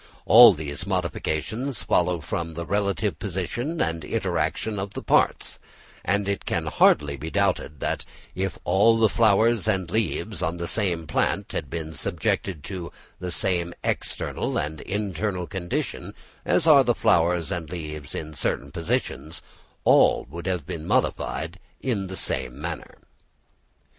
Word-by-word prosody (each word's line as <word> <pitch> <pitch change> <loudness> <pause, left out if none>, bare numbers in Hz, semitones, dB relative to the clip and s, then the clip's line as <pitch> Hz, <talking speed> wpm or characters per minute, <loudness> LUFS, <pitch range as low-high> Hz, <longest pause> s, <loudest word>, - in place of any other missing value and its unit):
All 115 -3 +9
these 75 +2 -5
modifications 95 - -2
follow 90 -1 +1
from 80 +1 -4
the 85 +1 -4
relative 100 -2 0
position 110 - -3
and 80 -2 -1
inter - - -1
action 105 -1 -1
of 100 +1 -4
the - - -5
parts; - - +2 0.4
and 100 +2 +1
it 100 -1 -1
can - - -1
hardly 70 -1 +3
be 80 +5 -5
doubted 95 -7 0
that - - -1 0.3
if 95 +1 -2
all 105 +5 +4
the 115 -1 +5
flowers 110 -1 +3
and 95 -3 0
leaves 110 -1 -1
on 85 +1 -1
the 85 - -3
same 85 -4 0
plant - - 0
had - - -4
been 80 -1 -5
subjected 95 -2 -2
to 90 -4 -6 0.3
the 90 -1 -4
same 85 -1 0
external - - -2
and 75 +1 -3
internal 100 -2 -2
condition, 90 -1 -4 0.3
as - - +2
are - - +8
the - - +2
flowers 85 0 +2
and 80 -4 -3
leaves 75 -4 -6
in 80 0 -5
certain - - -2
positions, - - -3 0.4
all - - +5
would 85 +4 -6
have 90 -6 -1
been 80 -2 -6
modified 80 +10 -1 0.2
in 110 -7 -1
the 95 - -6
same 65 -4 -1
manner. 80 +1 -6
90 Hz, 150 wpm, -25 LUFS, 80-100 Hz, 0.4 s, All